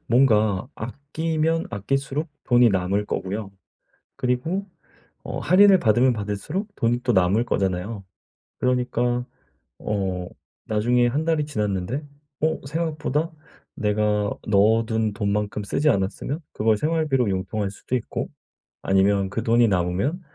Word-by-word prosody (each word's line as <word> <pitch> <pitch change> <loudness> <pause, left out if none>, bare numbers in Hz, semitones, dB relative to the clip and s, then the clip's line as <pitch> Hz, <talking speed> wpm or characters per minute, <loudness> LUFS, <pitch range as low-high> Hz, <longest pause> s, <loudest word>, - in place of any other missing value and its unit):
뭔가 110 -4 +3
아끼면 155 +6 -2
아낄수록 135 - -2 0.2
돈이 120 -1 +5
남을 100 +2 0
거고요. 100 +2 -3 0.7
그리고 145 +11 -1 0.6
어 - - -4
할인을 195 +1 +6
받으면 120 0 +4
받을수록 105 - -3
돈이 120 +1 +1
또 125 - +2
남을 95 +3 +3
거잖아요. 95 +1 -1 0.6
그러니까 125 -1 0 0.5
어 95 -4 -2 0.4
나중에 120 +3 +2
1 145 +6 -1
달이 160 -3 +1
지났는데 105 0 -2 0.4
어 160 +1 +1
생각보다 160 0 -1 0.4
내가 105 -1 +1 0.2
넣어둔 110 +1 +2
돈만큼 105 0 -1
쓰지 150 +9 +1
않았으면 105 - -1
그걸 110 0 +2
생활비로 150 -4 +1
융통할 95 +2 -2
수도 110 +5 -4
있고 120 - -3 0.5
아니면 95 0 +2
그 115 - -3
돈이 115 0 +4
남으면 95 - 0
115 Hz, 275 characters per minute, -24 LUFS, 100-140 Hz, 0.7 s, 할인을